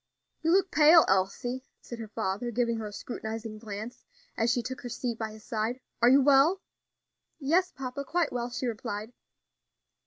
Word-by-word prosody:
"You 325 - 0
look 380 +1 +3
pale, 315 +2 +7
Elsie," 200 +7 0 0.2
said 240 - -9
her 225 - -6
father, 210 +2 -2
giving 235 0 0
her 220 -1 -4
a - - -8
scrutinizing 220 0 -6
glance 215 +2 -7 0.3
as 225 +1 +1
she 245 0 +1
took 260 +2 -6
her 245 - -6
seat 235 -1 -3
by 220 -1 -3
his 215 0 -13
side. 225 +3 -2 0.2
"Are 240 - +7
you 270 +1 +6
well?" 285 +7 +5 0.8
"Yes, 335 +6 +2
papa, 270 +1 -5
quite 335 +2 0
well," 240 0 -2
she 255 +1 -4
replied. 220 -1 -4
240 Hz, 175 wpm, -29 LUFS, 220-270 Hz, 0.8 s, pale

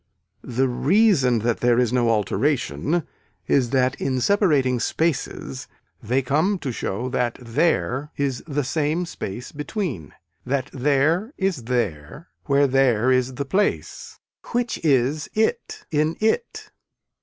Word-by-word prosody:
The 130 +1 0
reason 140 - +3
that 120 -1 +1
there 120 -1 +3
is 125 -1 +2
no 120 -2 +2
alteration 140 - 0 0.4
is 130 -4 +2
that 130 -1 +2
in 130 -1 0
separating 140 - +2
spaces 140 0 -2 0.3
they 125 +4 0
come 155 +10 +1
to 140 -7 -4
show 115 +1 -3
that 125 -2 -1
there 130 +2 0
is 135 -3 -1
the 145 -1 -1
same 155 +5 -1
space 120 - -7
between 145 - -4 0.3
that 130 0 -2
there 150 - +1
is 190 -11 -1
there 115 - -3 0.2
where 140 0 +3
there 130 -3 +3
is 130 0 +1
the 140 +2 -3
place 200 +8 -2 0.4
which 240 -5 -1
is 145 0 +1
it 220 - -1
in 155 +1 +1
it. 225 - -1
135 Hz, 130 wpm, -23 LUFS, 125-160 Hz, 0.4 s, reason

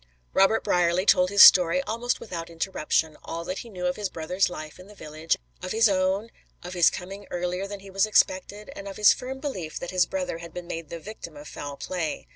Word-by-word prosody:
Robert 195 +3 +3
Brierly 175 +1 +2
told 180 -3 +5
his 200 0 +8
story 180 +7 +8
almost 245 0 -2
without 170 -5 -6
interruption; 160 -2 -1
all 165 +1 -6
that 185 +2 -4
he 235 - -9
knew 180 -4 -5
of 180 - 0
his 205 -2 -2
brother's 180 +3 0
life 155 -2 -8
in 185 - -13
the 210 - -15
village; 155 -1 -2 0.2
of 185 - -4
his 225 +1 +5
own; 195 +3 0 0.3
of 180 +1 -7
his 175 -3 +5
coming 195 +3 -8
earlier 180 +2 -3
than 200 -1 -8
he 195 0 -12
was 195 +2 +2
expected, 210 +3 +1
and 200 - -8
of 195 - -7
his 210 -1 +7
firm 260 +1 -6
belief 190 - -5
that 175 - -5
his 180 -2 +2
brother 275 -12 -3
had 170 0 -11
been 180 0 -6
made 165 -3 -6
the 170 - -6
victim 170 -4 -9
of 145 +1 -10
foul 145 -1 -7
play. 170 -2 -4
185 Hz, 225 wpm, -26 LUFS, 170-205 Hz, 0.3 s, his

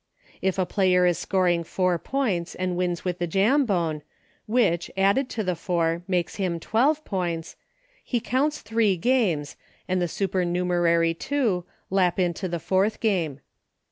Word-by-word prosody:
If 190 0 0
a 185 - +1
player 180 -2 +3
is 175 -1 +2
scoring 180 -3 +1
four 180 +1 0
points 210 -11 -2
and 185 -1 -2
wins 175 -1 -2
with 180 -1 -2
the 175 - -1
Jambone, 195 - +1 0.5
which, 210 -7 +1
added 200 +8 +2
to 220 - -3
the 180 -2 -1
four, 170 -1 0
makes 180 -3 -1
him 180 -4 -1
twelve 285 - +1
points, 170 -4 -3 0.5
he 245 - -1
counts 275 +6 0
three 215 -3 +1
games, 175 - +1 0.3
and 185 0 0
the 175 - +1
supernumerary 175 -2 +1
two 215 -4 -1 0.3
lap 185 -2 +2
into 180 +1 0
the 170 -1 -2
fourth 190 +6 0
game. 170 - 0
185 Hz, 145 wpm, -25 LUFS, 170-210 Hz, 0.5 s, player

